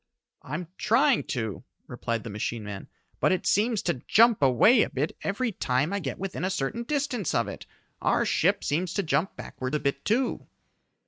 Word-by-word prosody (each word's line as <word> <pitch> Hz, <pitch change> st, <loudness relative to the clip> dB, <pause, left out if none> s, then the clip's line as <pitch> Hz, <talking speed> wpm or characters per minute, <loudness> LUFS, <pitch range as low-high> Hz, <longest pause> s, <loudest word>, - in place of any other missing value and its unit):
"I'm 155 Hz, +6 st, -5 dB
trying 255 Hz, +4 st, +3 dB
to," 110 Hz, -5 st, -3 dB, 0.2 s
replied 115 Hz, -1 st, -3 dB
the 115 Hz, -, -6 dB
machine 105 Hz, +2 st, -3 dB
man, 100 Hz, -2 st, -7 dB, 0.3 s
"but -, -, +3 dB
it 185 Hz, -, 0 dB
seems 215 Hz, +1 st, +2 dB
to 155 Hz, -8 st, -1 dB
jump 230 Hz, -2 st, +5 dB
away 140 Hz, -, +5 dB
a -, -, +1 dB
bit 145 Hz, +5 st, -2 dB
every 225 Hz, +5 st, -1 dB
time 150 Hz, -1 st, 0 dB
I 200 Hz, -, 0 dB
get 135 Hz, -9 st, -4 dB
within 195 Hz, -1 st, -4 dB
a 185 Hz, -, +1 dB
certain 190 Hz, +6 st, -2 dB
distance 265 Hz, -, -1 dB
of -, -, +1 dB
it. -, -, -8 dB, 0.3 s
Our -, -, +2 dB
ship -, -, +2 dB
seems 170 Hz, +4 st, -1 dB
to 200 Hz, -, +1 dB
jump 155 Hz, +3 st, 0 dB
backward 130 Hz, +3 st, -5 dB
a -, -, +1 dB
bit 140 Hz, -1 st, -2 dB
too." 245 Hz, +4 st, 0 dB
175 Hz, 185 wpm, -27 LUFS, 130-220 Hz, 0.3 s, jump